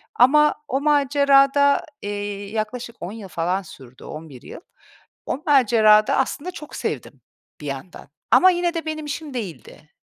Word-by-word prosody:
ama 300 +5 +5
o 270 +1 -1
macerada, 280 -1 +3 0.2
eee, 205 0 -5
yaklaşık 225 +2 -4
10 175 - -6
yıl 220 -3 -9
falan 180 +2 -2
sürdü, 130 -8 -14
11 155 -5 -10
yıl. - - -11 0.6
O 280 - -4
macerada 220 -6 +5
aslında 285 +6 -2
çok 300 -4 -10
sevdim - - -5 0.4
bir - - -9
yandan 140 +6 -8 0.2
ama 370 - +7
yine 350 -1 -1
de 330 -2 -4
benim 310 -1 -4
işim 295 0 -6
değildi. 180 -8 -8
250 Hz, 145 wpm, -22 LUFS, 200-290 Hz, 0.6 s, ama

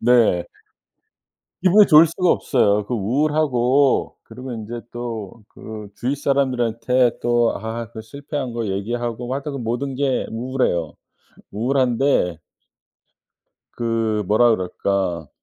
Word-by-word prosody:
네. 115 -8 +4 1.2
기분이 195 +2 +6
좋을 155 +1 +8
수가 170 +2 0
없어요. 105 -5 +2
그 125 - -2
우울하고 135 +2 +1
그리고 125 0 -9
인제 115 +1 -6
또 115 -3 -6
그 110 -1 -9
주위 130 +4 -1
사람들한테 125 -3 +1
또 120 -1 +2
아 115 +1 -5
그 110 - -7
실패한 140 +2 -6
거 115 -2 -3
얘기하고 120 +5 -3
하여튼 140 +1 -4
그 - - -5
모든 125 +3 -3
게 135 -2 0
우울해요. 115 - -1 0.6
우울한데 120 - +1 1.3
그 115 -2 -1
뭐라 110 +4 +4
그럴까. 90 -3 -2
120 Hz, 240 characters per minute, -21 LUFS, 110-135 Hz, 1.3 s, 좋을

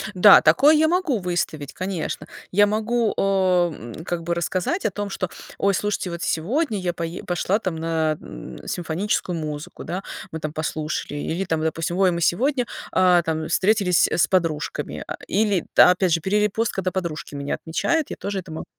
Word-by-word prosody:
Да, 195 +2 +8
такое 275 - +6
я 315 +1 +4
могу 345 - +1
выставить, 175 -5 -3
конечно. 185 -3 -4 0.2
Я 205 +2 +5
могу, 220 +2 0
э, - - +1
м, 180 - 0
как 170 -1 -3
бы 170 - -1
рассказать 180 - -1
о - - +2
том, 205 +1 -4
что: 185 -2 -3 0.3
"Ой, 200 0 +2
слушайте, 205 -1 -1
вот 170 0 -6
сегодня 220 - 0
я 175 -2 -2
пое 170 +1 -5
пошла 185 +3 0
там 185 -6 -3
на 160 -1 0
н - - -10
симфоническую 180 +1 -1
музыку, 150 -1 -6
да, 185 +3 -4 0.3
мы 160 - -5
там 155 -1 -4
послушали". 155 -1 -3
Или 170 +6 -2
там, 160 -3 -1
допустим: 165 +2 -2
"Ой, 190 -2 +4
мы 170 - -2
сегодня, 250 - +2 0.3
э, 180 -1 +5
там 160 -1 -2
встретились 190 -1 +3
с 150 -3 +2
подружками". 165 -5 -1
Э, - - -4
или, 205 -3 +1
опять 180 -1 +6
же, 165 - +1
перерепост, 210 +5 +1
когда 185 -1 -1
подружки 170 -6 -4
меня 140 0 -2
отмечают, 310 - -1
я - - -4
тоже 200 -1 -4
это 180 -3 -9
могу 160 - -6
180 Hz, 180 wpm, -23 LUFS, 160-205 Hz, 0.3 s, Да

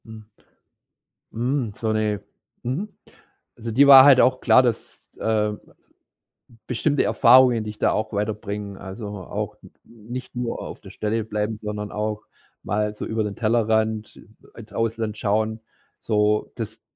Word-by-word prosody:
Mhm. 110 -1 -11 1.1
Hm, 120 -1 -1
so 110 -1 0
'ne 105 -1 0 0.4
mhm, 145 - -3 0.7
also, 115 -1 -5
dir 140 +6 +5
war 135 -1 +11
halt 140 -3 +7
auch 130 0 +2
klar, 130 - +6
dass, 120 -3 -3
ähm, 105 -1 0 1.1
bestimmte 140 +4 +1
Erfahrungen, 125 -2 +5
dich 105 0 -8
da - - +2
auch 110 +1 -2
weiterbringen, 105 -1 -4
also, 100 +3 -8
auch 100 -3 -5
n - - -15
nicht 120 +3 -9
nur 120 -1 -3
auf - - -8
der - - -12
Stelle 110 +1 -2
bleiben, 105 0 -3
sondern 105 -1 -6
auch 105 0 -3 0.4
mal 105 +1 -1
so - - -5
über 110 0 -1
den 105 -1 -4
Tellerrand 110 -1 0 0.3
ins 105 -3 -12
Ausland 115 -1 -2
schauen, 110 +2 0 0.4
so, 105 -1 +1
das, 110 -1 -7
110 Hz, 140 wpm, -23 LUFS, 105-115 Hz, 1.1 s, war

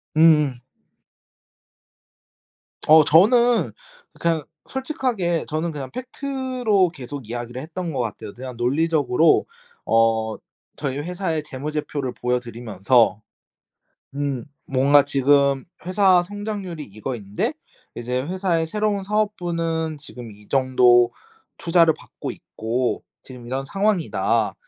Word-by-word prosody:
음음. 150 -5 +5 2.3
어 155 0 +8
저는 235 - +4 0.5
그냥 165 -2 +1 0.2
솔직하게 255 - -2
저는 160 +2 -2
그냥 140 -4 -6
팩트로 255 -6 0
계속 140 -5 -8
이야기를 120 +1 -5
했던 165 +2 -5
것 135 - -3
같아요. 110 -3 -4
그냥 130 0 -8
논리적으로 150 +3 +2 0.4
어 115 -1 +2 0.4
저희 140 -2 -3
회사의 165 -1 -2
재무제표를 145 -1 -4
보여 125 0 0
드리면서 115 -1 +1 0.9
음 140 -4 -2 0.2
뭔가 140 +2 +4
"지금 140 -1 +3 0.2
회사 185 -1 +4
성장률이 200 -3 -5
이거인데 105 -1 -4 0.4
이제 125 +2 -2
회사의 175 0 0
새로운 210 +2 -1
사업부는 170 -6 -1
지금 125 -5 -10
이 105 0 -17
정도 125 -2 +4 0.5
투자를 165 -1 +4
받고 - - -8
있고 120 +3 -3 0.2
지금 125 -2 -11
이런 130 +2 -2
상황이다. 195 +2 0
150 Hz, 245 characters per minute, -22 LUFS, 125-180 Hz, 2.3 s, 어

